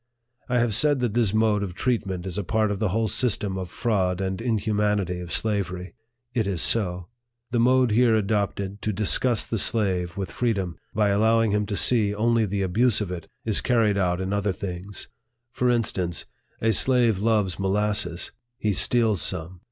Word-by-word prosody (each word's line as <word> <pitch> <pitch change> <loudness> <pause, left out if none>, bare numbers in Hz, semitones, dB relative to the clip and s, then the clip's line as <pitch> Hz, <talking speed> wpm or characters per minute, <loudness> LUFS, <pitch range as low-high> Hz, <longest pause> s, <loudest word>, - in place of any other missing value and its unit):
I 125 - +1
have 120 -2 +1
said 145 +4 +3
that 120 -4 -1
this 115 -4 +2
mode 110 -1 +2
of 95 -3 -5
treatment 95 -7 -2
is 95 +1 -3
a - - -2
part 110 +2 0
of 100 - -3
the 105 -3 0
whole 110 +4 0
system 105 -4 0
of 95 -2 -5
fraud 95 -4 -1
and 95 +1 -3
inhumanity 105 -5 0
of 90 -2 -8
slavery. 95 -4 -2 0.4
It 110 -4 0
is 95 -4 -2
so. 90 -5 0 0.4
The 120 - +1
mode 125 0 +3
here 115 +1 +4
adopted 100 -1 -2
to 105 - -2
disgust 110 +4 +2
the 115 - 0
slave 95 -6 +1
with 95 -3 -4
freedom, 100 -8 -1 0.2
by 105 -1 +2
allowing 110 +2 +2
him 105 0 0
to 100 - -3
see 105 -2 +3
only 115 0 +2
the 100 0 -2
abuse 110 +5 +2
of 100 -4 -4
it, 85 -3 -6 0.2
is 110 -2 +1
carried 115 -5 +2
out 90 -1 0
in 95 +1 -3
other 100 0 0
things. 95 +1 -7 0.4
For 125 -1 0
instance, 95 -8 -1 0.4
a 115 0 +2
slave 120 -2 +3
loves 105 -4 +1
molasses; 100 -2 -1 0.3
he 105 -3 0
steals 110 -2 +2
some. 85 +3 -2
105 Hz, 180 wpm, -24 LUFS, 95-115 Hz, 0.4 s, here